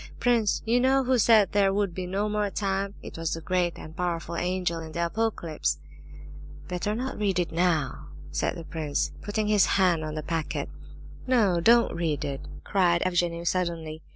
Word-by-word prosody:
Prince, 230 -3 +2
you 235 +2 +3
know 265 +2 +3
who 255 -1 +2
said 215 -3 +5
there 200 -1 +3
would 200 -2 0
be 180 +1 -4
'no 200 +3 -1
more 210 -1 0
time'? 195 0 -2
It - - -8
was 165 -1 -1
the - - -6
great 175 +1 0
and 160 - -10
powerful 170 -2 -2
angel 180 -1 -1
in 160 -1 -8
the 170 0 0
Apocalypse." 170 - -1 0.9
"Better 180 +4 -2
not 255 +1 -4
read 200 -3 +1
it 175 -2 0
now," 160 - 0 0.2
said 75 - -1
the 170 - -7
prince, 155 -4 -2
putting 210 +1 -2
his 210 -2 +4
hand 180 -4 +3
on 155 0 -4
the 155 - -4
packet. 165 0 -3 0.6
"No, 215 -9 +3
don't 235 +5 +5
read 160 -4 -1
it!" 135 -1 -4 0.2
cried 175 -3 +2
Evgenie 175 -2 0
suddenly. 165 -3 -2
180 Hz, 180 wpm, -27 LUFS, 165-205 Hz, 0.9 s, said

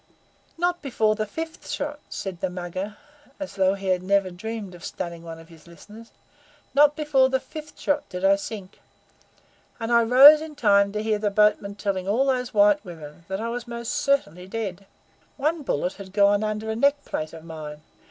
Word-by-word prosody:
"Not 350 +1 0
before 225 -6 +1
the 215 0 -3
fifth 320 +9 -7
shot," 295 +1 -3
said 190 -3 -5
the 190 - -1
Mugger, 185 +3 -5 0.4
as 290 - -6
though 190 0 +2
he 195 -1 -4
had 180 -1 +2
never 195 0 +1
dreamed 210 +1 -6
of 175 0 -13
stunning 170 -2 -5
one 165 -1 -8
of 165 +1 -15
his 165 0 -17
listeners 215 +7 -14 0.6
"not 290 +1 +5
before 290 -4 +3
the 265 0 +1
fifth 305 +2 -10
shot 290 0 -1
did 180 +1 -3
I 195 +1 +6
sink, 200 -1 -8 1.0
and 230 0 -3
I 235 0 +6
rose 270 +6 +9
in 315 -1 -8
time 200 -5 +4
to 210 0 -2
hear 215 -1 -1
a 205 - +3
boatman 205 -1 +2
telling 195 -2 -2
all 235 +7 +2
those 250 -2 0
white 205 -1 +4
women 165 -3 -11
that 190 0 -3
I 230 +1 -3
was 240 +1 -5
most 235 0 -4
certainly 185 - 0
dead. 195 -2 -5 0.5
One 310 +3 0
bullet 180 - -1
had 195 -2 -11
gone 205 0 +4
under 215 +1 -2
a - - -2
neck 280 +4 +2
plate 155 0 -4
of 160 -1 -10
mine. 155 -2 -8
210 Hz, 190 wpm, -24 LUFS, 185-255 Hz, 1.0 s, rose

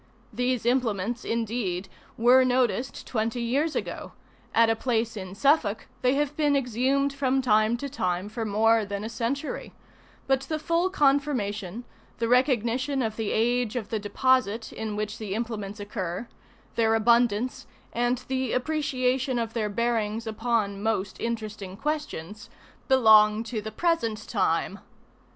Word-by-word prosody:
These 245 +1 0
implements, 235 -2 0
indeed, 220 -5 -2 0.3
were 250 +3 +6
noticed 255 0 0
twenty 225 0 -2
years 285 +7 0
ago; - - -4 0.4
at 230 0 +5
a 225 - +2
place 230 -1 -1
in 190 -2 -7
Suffolk 250 -4 +2 0.2
they 255 +1 +3
have 295 0 0
been 295 -2 +2
exhumed 270 +2 +1
from 270 -1 +1
time 215 -2 +3
to 280 - -4
time 185 -8 -2
for 225 +2 -4
more 220 +1 +3
than 200 0 -4
a 220 - -4
century; 240 +6 -3 0.5
but 270 0 +2
the 310 +4 -3
full 335 +4 +1
confirmation, 245 - 0 0.3
the 230 - -1
recognition 250 +1 +2
of 220 -1 -2
the 220 -2 -2
age 240 +1 +1
of 220 -5 -3
the 220 - -1
deposit 225 0 +1
in 220 -1 -4
which 210 +1 -4
the 205 -3 -4
implements 215 -3 -4
occur, 205 0 -4 0.5
their 225 -1 +2
abundance, 235 +1 +2 0.3
and 245 +1 0
the 260 -2 -1
appreciation 260 -2 0
of 230 -1 -2
their 215 -3 -1
bearings 225 0 -1
upon 220 -2 -1
most 210 -3 -1
interesting 215 -4 -4
questions, 225 - -4 0.4
belong 220 -4 +6
to 230 -2 -4
the 220 +1 -6
present 230 -7 -1
time. 195 -1 0
230 Hz, 140 wpm, -26 LUFS, 215-255 Hz, 0.5 s, were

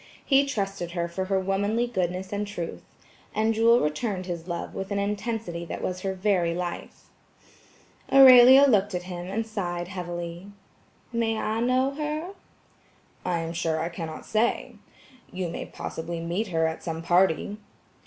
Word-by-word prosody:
He 275 0 +4
trusted 195 -8 -3
her 170 -1 -1
for 185 +2 -3
her 190 0 +1
womanly 200 +5 0
goodness 185 -4 -2
and 205 0 -2
truth. 175 -5 -5 0.5
And 220 +1 +2
Jewel 230 +2 +5
returned 185 +5 -2
his 175 -1 -5
love 175 -1 -4
with 195 - -5
an 200 - -1
intensity 205 -3 -3
that - - -6
was 180 0 -2
her 190 0 -2
very 185 -3 +1
life. 175 -1 -5 1.1
Aurelia 265 0 +9
looked 205 -5 +2
at 180 - -3
him 175 -1 -6
and 220 +4 -2
sighed 175 -5 -4
heavily. 175 -1 -6 0.7
"May 225 -1 0
I 220 +1 -1
know 255 +3 +2
her?" 305 +4 -4 0.9
"I 175 -2 -1
am 165 0 -4
sure, 165 -2 -1
I 165 +2 -2
cannot 165 -2 -7
say. 225 +2 0 0.6
You 180 -1 -3
may - - -5
possibly 165 +1 -5
meet 175 +6 -2
her 165 -3 +1
at 160 0 -2
some 165 -1 -5
party." 180 +3 +2
190 Hz, 155 wpm, -26 LUFS, 175-225 Hz, 1.1 s, Aurelia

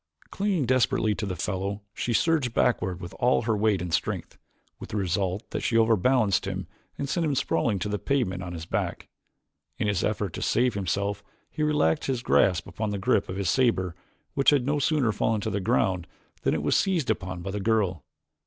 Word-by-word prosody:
Clinging 195 -7 0
desperately 120 -3 +2
to 105 0 -4
the 90 - -3
fellow 100 +4 -3
she 120 - -2
surged 135 -1 +1
backward 95 -7 +1
with 85 0 -8
all 125 -1 +3
her 115 -1 +1
weight 105 -3 +1
and 85 -2 -5
strength - - -2 0.4
with - - -9
the 105 - -3
result 95 +1 -1
that - - -2
she 115 - +1
overbalanced 115 -1 +3
him - - -3 0.3
and 140 - -3
sent 170 +5 0
him 150 -3 +1
sprawling 120 -5 +1
to 95 - -3
the 105 0 -2
pavement 120 -10 0
upon 90 -2 -6
his 80 -1 -6
back. - - -3 0.7
In - - -1
his 100 -3 0
efforts 105 -4 -1
to - - -5
save 125 -1 +2
himself 100 +2 -2 0.3
he 155 - -5
relaxed 150 - +2
his 130 -3 -1
grasp 90 -8 +3
upon 110 -1 -4
the 100 - -2
grip 100 0 +1
of 90 - -4
his 95 -3 +1
saber 110 -9 +2 0.4
which 140 - +4
had 140 -4 +3
no 145 +2 +1
sooner 140 -5 +2
fallen 110 +1 0
to 110 - -2
the 100 - -1
ground 90 -2 +1 0.3
than - - +1
it 75 - -2
was 75 - +2
seized 175 - +2
upon 95 -4 -4
by 95 - -4
the 105 - -3
girl. 100 - +1
105 Hz, 205 wpm, -26 LUFS, 95-125 Hz, 0.7 s, which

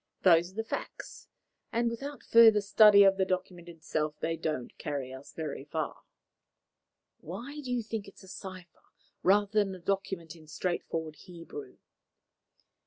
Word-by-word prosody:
Those 175 0 +5
are - - -21
the 225 - -2
facts, 225 - -7 0.4
and 235 0 +1
without 275 +5 -5
further 225 -2 +7
study 205 0 +7
of 195 0 +5
the 190 - +3
document 185 -2 -3
itself, 155 -2 -3
they 165 0 -1
don't 155 -6 -4
carry 135 -3 -4
us 130 +1 -11
very 150 -4 -5
far." 155 +1 -4 1.2
"Why 280 +5 -7
do 260 -3 -6
you 245 -2 0
think 215 -2 -5
it 195 - -13
is - - -16
a - - -14
cipher 185 -2 -10 0.4
rather 205 +2 +4 0.2
than 195 -1 -5
a - - -11
document 180 -3 -3
in 160 -2 -16
straightforward 160 -1 -3
Hebrew?" 180 - -10
185 Hz, 155 wpm, -30 LUFS, 160-210 Hz, 1.2 s, further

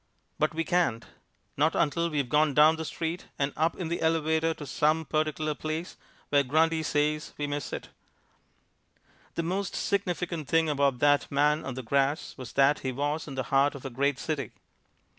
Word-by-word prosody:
But 155 +1 +1
we 165 - 0
can't, 170 -10 +1 0.5
not 155 +3 +2
until 170 +1 +1
we've 145 -5 -1
gone 150 +2 +2
down 155 +2 +6
the 160 0 -5
street 165 +2 -4
and 140 0 -1
up 160 +2 +1
in 180 - -3
the 170 +1 -3
elevator 160 0 +2
to 150 - -8
some 155 +4 +1
particular 155 0 -1
place 155 +3 -4 0.3
where 145 -1 +4
Grundy 160 +4 +2
says 150 0 0
we 145 - -2
may 145 0 -2
sit. 140 - -6 1.5
The 170 - -1
most 190 +3 -2
significant 175 -5 -2
thing 165 0 +3
about 140 -3 +2
that 145 0 +3
man 150 +2 +2
on 135 - -5
the 130 - -5
grass 140 +5 0
was 125 -4 -9
that 140 +2 +4
he 130 - -3
was 145 +5 -2
in 140 - -7
the 130 - -1
heart 140 +2 +4
of 140 - -10
a 135 - -4
great 140 +2 0
city. 140 -4 -3
150 Hz, 180 wpm, -28 LUFS, 140-160 Hz, 1.5 s, down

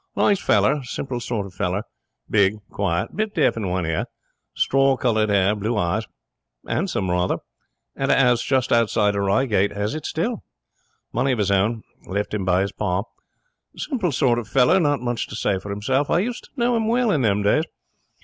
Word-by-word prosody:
'Nice 200 -2 +2
feller. 110 +8 +3
Simple 125 0 -4
sort 115 -4 -3
of 95 - -11
feller. 90 +3 -2 0.4
Big. 100 -1 +3 0.2
Quiet. 85 -4 -2
Bit 215 0 -2
deaf 150 -6 +3
in 110 -4 -3
one 90 -1 -1
ear. 80 -1 -1 0.5
Straw 135 0 +3
coloured 110 -4 +1
hair. 100 +1 +3
Blue 105 +2 -2
eyes. 100 +4 0 0.6
'Andsome, 155 - -1
rather. 90 +1 +1 0.6
Had 135 0 -1
a - - +4
'ouse 125 -3 +4
just 130 -2 0
outside 110 -3 +2
of 100 - 0
Reigate. 100 0 +1
Has 105 +4 -1
it 155 - -4
still. 215 +8 -2 0.7
Money 130 +3 +1
of - - -2
his 105 -2 +1
own. 105 +3 +1 0.2
Left 100 +3 -3
him 105 -2 -1
by 90 0 +3
his 100 0 -1
pa. 90 +2 -1 0.7
Simple 220 - -1
sort 125 -2 +2
of 115 - -7
feller. 135 - +4
Not 145 -6 +1
much 120 -1 -2
to - - -8
say 100 -3 0
for 100 - -9
himself. 130 +8 0
I - - +3
used 235 +7 -2
to - - -20
know 240 0 +2
him 225 -1 0
well 240 -1 +2
in 150 - +1
them 105 -3 +1
days. 150 +10 +3
115 Hz, 190 wpm, -22 LUFS, 100-135 Hz, 0.7 s, a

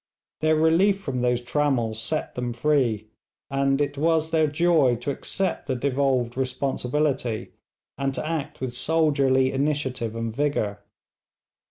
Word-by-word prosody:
Their 155 0 +3
relief 170 +6 +3
from 135 -10 -3
those 125 0 +1
trammels 120 -5 0
set 155 +7 -2
them 125 -1 -3
free, 120 -5 +1 0.4
and 135 0 +1
it 145 -1 -1
was 160 0 +2
their 160 -1 +3
joy 150 -4 +3
to 120 +5 -3
accept 190 +7 -2
the 130 - 0
devolved 130 -2 0
responsibility, 130 -1 -1 0.5
and 135 0 0
to 155 - -3
act 155 -3 -4
with 130 -2 -3
soldierly 140 -3 +2
initiative 135 -5 -1
and 115 -1 -3
vigour. 125 -8 -1
135 Hz, 135 wpm, -25 LUFS, 125-150 Hz, 0.5 s, Their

